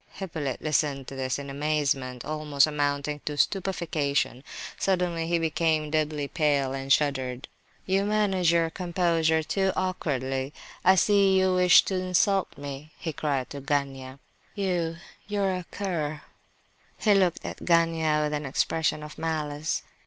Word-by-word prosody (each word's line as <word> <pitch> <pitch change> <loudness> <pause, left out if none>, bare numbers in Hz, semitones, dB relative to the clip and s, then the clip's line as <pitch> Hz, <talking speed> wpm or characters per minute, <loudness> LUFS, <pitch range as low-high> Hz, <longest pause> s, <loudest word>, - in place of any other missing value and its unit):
Hippolyte 160 -9 -4
listened 145 -3 0
to 135 - -8
this 130 -1 -1
in 140 0 -7
amazement, 140 -3 -1
almost 150 -2 +2
amounting 145 -1 -1
to 150 -1 -3
stupefaction. 155 -9 0 0.4
Suddenly 180 -3 0
he 170 0 +2
became 160 -1 0
deadly 155 -2 0
pale 140 -4 +1
and 135 0 -4
shuddered. 135 -3 +1 0.4
"You 190 +1 +2
manage 200 -5 +2
your 165 -1 +2
composure 170 -3 +1
too 190 +4 0
awkwardly. 135 -7 -2 0.3
I 190 - +6
see 195 -1 +4
you 190 0 +3
wish 180 -1 +6
to - - -2
insult 185 0 +1
me," 140 +1 -7
he 160 - -4
cried 140 -4 -2
to 140 - -6
Gania. 135 -2 -2 0.4
"You—you 180 +1 -3
are 195 -2 +1
a 180 - -7
cur!" 155 -7 -3 0.7
He 210 - +3
looked 185 -3 +2
at - - -6
Gania 165 -2 +2
with 150 0 -1
an 150 -1 -2
expression 155 +2 0
of 150 -1 -10
malice. 155 -2 -2
155 Hz, 140 wpm, -27 LUFS, 140-180 Hz, 0.7 s, I